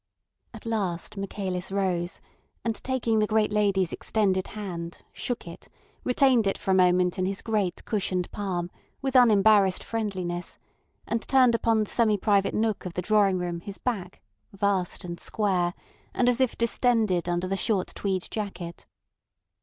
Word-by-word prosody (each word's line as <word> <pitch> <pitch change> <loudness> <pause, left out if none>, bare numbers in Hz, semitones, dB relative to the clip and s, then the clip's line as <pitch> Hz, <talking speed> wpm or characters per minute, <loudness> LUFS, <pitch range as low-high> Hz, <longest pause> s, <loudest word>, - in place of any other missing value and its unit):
At - - -12
last 200 -7 -2
Michaelis 190 -2 -4
rose, 185 -3 -1 0.4
and 230 - +1
taking 240 -4 +1
the 210 - +2
great 215 -1 +1
lady's 195 -4 +2
extended 190 -4 0
hand, 170 -5 -6
shook 245 -7 -4
it, 170 - -10 0.4
retained 250 -3 +3
it 195 - 0
for 190 - -2
a - - +5
moment 180 -1 +3
in 185 - +1
his 195 0 -3
great 210 -6 -1
cushioned 185 -4 -1
palm 180 -4 -3 0.3
with 270 -1 -2
unembarrassed 210 -5 +5
friendliness, 185 -6 -3 0.5
and 230 - -1
turned 255 -3 +5
upon 225 -1 +2
the 210 - -7
semi 220 -3 +3
private 200 0 +2
nook 220 -1 0
of 175 - -9
the 180 - -2
drawing 200 -1 +3
room 175 -1 -3
his 200 +2 -7
back, 195 -7 -4 0.3
vast 195 -2 -1
and 170 -1 -6
square, 185 -5 0 0.4
and 245 - +2
as 245 +1 +3
if 260 - +1
distended 225 -6 +1
under 175 +1 0
the 195 - -1
short 195 -2 0
tweed 190 -3 -2
jacket. 185 -5 -6
200 Hz, 155 wpm, -26 LUFS, 180-220 Hz, 0.5 s, a